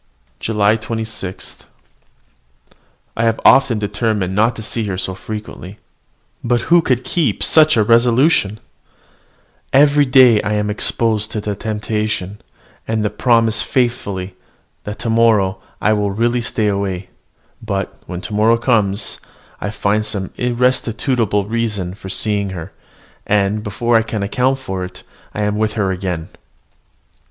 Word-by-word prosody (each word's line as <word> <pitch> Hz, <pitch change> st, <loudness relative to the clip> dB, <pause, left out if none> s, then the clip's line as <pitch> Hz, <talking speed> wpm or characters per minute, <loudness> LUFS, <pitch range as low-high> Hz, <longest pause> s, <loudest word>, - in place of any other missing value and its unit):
JULY 105 Hz, 0 st, +1 dB
26. 110 Hz, -4 st, -6 dB, 1.6 s
I 110 Hz, -, -1 dB
have 115 Hz, -1 st, +1 dB
often 130 Hz, -4 st, +5 dB
determined 105 Hz, -2 st, -1 dB
not 110 Hz, +4 st, +2 dB
to 110 Hz, -, -7 dB
see 110 Hz, +1 st, -3 dB
her 95 Hz, -3 st, -3 dB
so 95 Hz, -, -3 dB
frequently. 105 Hz, -1 st, -8 dB, 0.7 s
But 120 Hz, 0 st, +1 dB
who 175 Hz, -, +7 dB
could 130 Hz, -5 st, 0 dB
keep 165 Hz, +3 st, 0 dB
such 155 Hz, -5 st, +5 dB
a 110 Hz, -, +4 dB
resolution? 115 Hz, -, +3 dB, 1.1 s
Every 145 Hz, +1 st, +5 dB
day 125 Hz, -4 st, +6 dB
I 105 Hz, -, -2 dB
am 105 Hz, 0 st, 0 dB
exposed 110 Hz, 0 st, +1 dB
to 110 Hz, -, -2 dB
the 105 Hz, 0 st, -3 dB
temptation, 105 Hz, -2 st, -3 dB, 0.5 s
and 110 Hz, -1 st, -1 dB
promise 115 Hz, -3 st, +3 dB
faithfully 100 Hz, -7 st, -2 dB, 0.5 s
that 105 Hz, 0 st, -5 dB
to 115 Hz, -, -4 dB
morrow 105 Hz, -4 st, +2 dB, 0.2 s
I 105 Hz, -, +2 dB
will 105 Hz, -1 st, 0 dB
really 120 Hz, +4 st, 0 dB
stay 110 Hz, -2 st, 0 dB
away: 100 Hz, -2 st, -2 dB, 0.5 s
but, 100 Hz, -3 st, -3 dB
when 90 Hz, -1 st, -6 dB
tomorrow 105 Hz, +4 st, +2 dB
comes, 110 Hz, -5 st, 0 dB, 0.4 s
I 105 Hz, -, -2 dB
find 105 Hz, 0 st, 0 dB
some 105 Hz, -3 st, -3 dB
irresistible 120 Hz, -3 st, 0 dB
reason 105 Hz, -5 st, -2 dB
for 95 Hz, -1 st, -10 dB
seeing 100 Hz, 0 st, 0 dB
her; 80 Hz, -, -8 dB, 0.6 s
and, 105 Hz, +1 st, +1 dB
before 115 Hz, +3 st, +1 dB
I -, -, +3 dB
can 110 Hz, -2 st, -4 dB
account 125 Hz, +6 st, 0 dB
for 95 Hz, -9 st, -5 dB
it, 90 Hz, -, -9 dB, 0.3 s
I 105 Hz, -, -1 dB
am 105 Hz, 0 st, -1 dB
with 110 Hz, 0 st, 0 dB
her 100 Hz, -4 st, 0 dB
again. 90 Hz, -3 st, -4 dB
110 Hz, 135 wpm, -18 LUFS, 100-115 Hz, 1.6 s, who